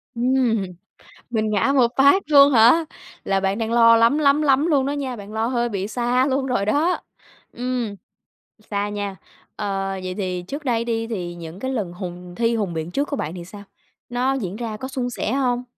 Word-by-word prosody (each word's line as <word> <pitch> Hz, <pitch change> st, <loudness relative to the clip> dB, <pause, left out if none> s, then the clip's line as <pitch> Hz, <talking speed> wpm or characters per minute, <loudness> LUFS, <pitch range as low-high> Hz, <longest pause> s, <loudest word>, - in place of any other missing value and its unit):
Ừm, 240 Hz, -3 st, +1 dB, 0.7 s
mình 220 Hz, -2 st, 0 dB
ngã 215 Hz, +6 st, +2 dB
một 245 Hz, -3 st, +4 dB
phát 280 Hz, +8 st, +5 dB
luôn 285 Hz, -1 st, +7 dB
hả? 245 Hz, +8 st, +6 dB, 0.4 s
Là 195 Hz, 0 st, +1 dB
bạn 195 Hz, +2 st, 0 dB
đang 225 Hz, 0 st, -2 dB
lo 230 Hz, -1 st, +6 dB
lắm, 230 Hz, +6 st, +4 dB
lắm, 290 Hz, 0 st, +3 dB
lắm 280 Hz, +1 st, +3 dB
luôn 285 Hz, -5 st, +2 dB
đó 280 Hz, -, -1 dB
nha! 270 Hz, -4 st, -3 dB
Bạn 205 Hz, -1 st, -10 dB
lo 220 Hz, +1 st, -1 dB
hơi 240 Hz, -1 st, 0 dB
bị 200 Hz, -3 st, -3 dB
xa 245 Hz, +3 st, +1 dB
luôn 270 Hz, -1 st, 0 dB
rồi 245 Hz, -6 st, 0 dB
đó! 305 Hz, +11 st, +1 dB, 0.5 s
Ừm, 245 Hz, -4 st, -3 dB, 0.7 s
xa 205 Hz, 0 st, -1 dB
nha. 205 Hz, -1 st, -4 dB, 0.4 s
Ờ, 195 Hz, -2 st, -2 dB
vậy 185 Hz, 0 st, -4 dB
thì 185 Hz, -2 st, -3 dB
trước 290 Hz, +2 st, -6 dB
đây 235 Hz, -3 st, 0 dB
đi 225 Hz, -1 st, -2 dB
thì 180 Hz, -6 st, -4 dB
những 170 Hz, 0 st, -9 dB
cái 260 Hz, -, -3 dB
lần 205 Hz, -9 st, -3 dB
hùng 180 Hz, -1 st, -8 dB
thi 235 Hz, 0 st, +1 dB
hùng 200 Hz, -5 st, -2 dB
biện 160 Hz, +1 st, -4 dB
trước 280 Hz, +9 st, -1 dB
của 285 Hz, -, -2 dB
bạn 155 Hz, -, -4 dB
thì 175 Hz, -2 st, -7 dB
sao? 200 Hz, +3 st, -11 dB, 0.5 s
Nó 250 Hz, +2 st, 0 dB
diễn 205 Hz, -7 st, -4 dB
ra 225 Hz, -2 st, -4 dB
có 260 Hz, +5 st, -6 dB
suôn 255 Hz, -2 st, -3 dB
sẻ 220 Hz, -, -3 dB
hông? 250 Hz, -2 st, 0 dB
230 Hz, 205 wpm, -22 LUFS, 200-265 Hz, 0.7 s, luôn